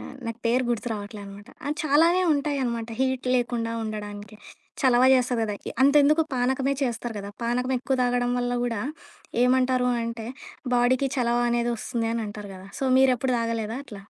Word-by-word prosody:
ఆహ్, -, -, -9 dB
నాకు 230 Hz, 0 st, -4 dB
పేరు 250 Hz, +2 st, +2 dB
గుర్తు 240 Hz, +1 st, -1 dB
రావట్లేనమాట. 205 Hz, 0 st, -8 dB, 0.2 s
ఆ -, -, -1 dB
చాలానే 330 Hz, +5 st, +4 dB
ఉంటాయనమాట 265 Hz, -6 st, -1 dB
హీట్ 260 Hz, -1 st, 0 dB
లేకుండా 235 Hz, -2 st, -1 dB
ఉండడానికి. 210 Hz, -1 st, -6 dB, 0.4 s
చలవ 250 Hz, -3 st, +4 dB
జేస్తది 250 Hz, -2 st, +2 dB
గదా! 210 Hz, -1 st, -3 dB
ఇ -, -, -4 dB
అంతెందుకు 295 Hz, +3 st, +5 dB
పానకమే 265 Hz, +2 st, +1 dB
చేస్తరు 240 Hz, -2 st, -2 dB
గదా! 200 Hz, 0 st, -6 dB
పానకమెక్కువ 250 Hz, +2 st, 0 dB
తాగడం 245 Hz, 0 st, +1 dB
వల్ల 245 Hz, 0 st, -1 dB
గూడా 230 Hz, -4 st, -1 dB, 0.6 s
ఏమంటారు 255 Hz, 0 st, +3 dB, 0.2 s
అంటే, 230 Hz, -1 st, -5 dB, 0.5 s
బాడీకి 255 Hz, +3 st, +3 dB
చలవ 240 Hz, -1 st, +1 dB
అనేది 240 Hz, 0 st, +1 dB
ఒస్తుంది 230 Hz, 0 st, -2 dB
అనంటారు 210 Hz, -3 st, -5 dB
గదా! 185 Hz, +1 st, -11 dB
సో, 270 Hz, -, -2 dB
మీరెప్పుడు 260 Hz, -1 st, +3 dB
దాగలేదా 230 Hz, -1 st, -2 dB
అట్లా? 205 Hz, -5 st, -10 dB
245 Hz, 150 wpm, -25 LUFS, 225-260 Hz, 0.6 s, అంతెందుకు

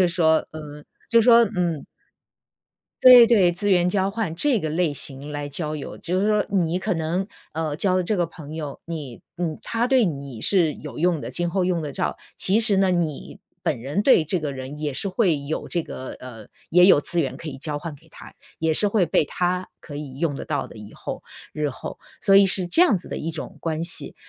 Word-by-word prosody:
就 -, -, +6 dB
是 180 Hz, -, +3 dB
说 160 Hz, -2 st, +2 dB
嗯， 150 Hz, -1 st, -9 dB, 0.2 s
就 230 Hz, -1 st, +5 dB
是 -, -, +1 dB
说 235 Hz, -1 st, +7 dB
嗯。 170 Hz, -5 st, -1 dB, 1.2 s
对 250 Hz, -2 st, +10 dB
对， 205 Hz, -7 st, +4 dB
资 190 Hz, +4 st, -1 dB
源 180 Hz, -2 st, +3 dB
交 190 Hz, +1 st, 0 dB
换， 205 Hz, -6 st, -3 dB
这 250 Hz, -, +1 dB
个 160 Hz, -, -3 dB
类 160 Hz, 0 st, 0 dB
型 140 Hz, +1 st, -5 dB
来 145 Hz, -1 st, -4 dB
交 150 Hz, +1 st, -3 dB
友。 150 Hz, -, -7 dB
就 180 Hz, +2 st, -2 dB
是 200 Hz, -, +1 dB
说 210 Hz, -1 st, +2 dB
你 180 Hz, -3 st, 0 dB
可 195 Hz, +3 st, -2 dB
能， 170 Hz, +3 st, -2 dB, 0.3 s
嗯， 155 Hz, -2 st, -2 dB
交 185 Hz, -2 st, +2 dB
的 185 Hz, -, 0 dB
这 215 Hz, -, 0 dB
个 175 Hz, -3 st, 0 dB
朋 155 Hz, -3 st, -11 dB
友 150 Hz, -3 st, -6 dB
你 150 Hz, -8 st, -7 dB, 0.2 s
嗯， 165 Hz, -3 st, -3 dB
他 230 Hz, +1 st, -1 dB
对 255 Hz, -2 st, +3 dB
你 140 Hz, -, -5 dB
是 170 Hz, -7 st, +4 dB
有 150 Hz, -, -9 dB
用 175 Hz, 0 st, +1 dB
的， 115 Hz, -, -6 dB
今 175 Hz, +6 st, -1 dB
后 185 Hz, +2 st, 0 dB
用 180 Hz, -2 st, 0 dB
得 150 Hz, -3 st, -5 dB
着。 -, -, -3 dB, 0.2 s
其 200 Hz, +4 st, +2 dB
实 220 Hz, -3 st, +5 dB
呢， 190 Hz, -1 st, +3 dB
你 165 Hz, -5 st, -3 dB, 0.2 s
本 155 Hz, -9 st, -1 dB
人 145 Hz, -, -2 dB
对 235 Hz, -8 st, +5 dB
这 160 Hz, +4 st, -2 dB
个 150 Hz, -3 st, -4 dB
人 135 Hz, +2 st, -8 dB
也 150 Hz, -1 st, -3 dB
是 195 Hz, -, -2 dB
会 185 Hz, -5 st, +1 dB
有 155 Hz, +3 st, -4 dB
这 170 Hz, -, -2 dB
个 130 Hz, -4 st, -8 dB
呃， 115 Hz, -4 st, -10 dB, 0.2 s
也 180 Hz, +1 st, +5 dB
有 185 Hz, -6 st, +6 dB
资 170 Hz, +3 st, -1 dB
源 135 Hz, -, -5 dB
可 165 Hz, -, -7 dB
以 145 Hz, -, -7 dB
交 145 Hz, +1 st, -5 dB
换 155 Hz, 0 st, -7 dB
给 140 Hz, -, -20 dB
他， -, -, -13 dB, 0.2 s
也 160 Hz, 0 st, 0 dB
是 210 Hz, -, +4 dB
会 200 Hz, -4 st, +2 dB
被 155 Hz, -, +2 dB
他 180 Hz, +4 st, -2 dB
可 145 Hz, -, -9 dB
以 140 Hz, -3 st, -8 dB
用 155 Hz, -3 st, -1 dB
得 -, -, -6 dB
到 145 Hz, -3 st, -2 dB
的， -, -, -14 dB
以 105 Hz, -1 st, -11 dB
后， -, -, -7 dB, 0.3 s
日 150 Hz, -1 st, -1 dB
后。 130 Hz, -, -8 dB, 0.2 s
所 195 Hz, -1 st, +4 dB
以 200 Hz, -, +7 dB
是 190 Hz, -1 st, +3 dB
这 330 Hz, -, +5 dB
样 225 Hz, -, +3 dB
子 175 Hz, -, -10 dB
的 -, -, -5 dB
一 165 Hz, -, -4 dB
种 160 Hz, -, -7 dB
关 160 Hz, -1 st, -2 dB
系。 170 Hz, -, +3 dB
165 Hz, 250 characters per minute, -23 LUFS, 150-190 Hz, 1.2 s, 对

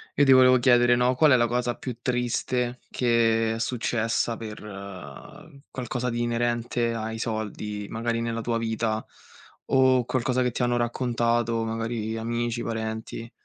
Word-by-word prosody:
Io 145 Hz, -, +4 dB
ti 135 Hz, -, +5 dB
volevo 130 Hz, 0 st, +6 dB
chiedere, 120 Hz, -1 st, +5 dB
no, 125 Hz, +1 st, +2 dB
qual 150 Hz, +3 st, +5 dB
è -, -, +7 dB
la 120 Hz, -1 st, +3 dB
cosa 120 Hz, 0 st, -1 dB
più 125 Hz, -1 st, -6 dB
triste 125 Hz, 0 st, -1 dB
che 115 Hz, -2 st, +2 dB
è -, -, -5 dB
successa 115 Hz, -1 st, -1 dB
per 110 Hz, -1 st, -7 dB, 1.1 s
qualcosa 125 Hz, 0 st, -3 dB
di 120 Hz, 0 st, -2 dB
inerente 120 Hz, 0 st, 0 dB
ai 110 Hz, 0 st, -4 dB
soldi, 105 Hz, -2 st, -4 dB
magari 115 Hz, +1 st, -2 dB
nella 115 Hz, 0 st, -2 dB
tua 115 Hz, 0 st, -1 dB
vita, 110 Hz, -1 st, -1 dB, 0.6 s
o 130 Hz, -2 st, +4 dB
qualcosa 130 Hz, +1 st, 0 dB
che 125 Hz, -, 0 dB
ti 120 Hz, -, -4 dB
hanno 120 Hz, 0 st, +1 dB
raccontato, 120 Hz, -1 st, 0 dB
magari 115 Hz, 0 st, -3 dB
amici, 120 Hz, +1 st, -2 dB
parenti? 110 Hz, 0 st, -5 dB
120 Hz, 145 wpm, -26 LUFS, 115-125 Hz, 1.1 s, è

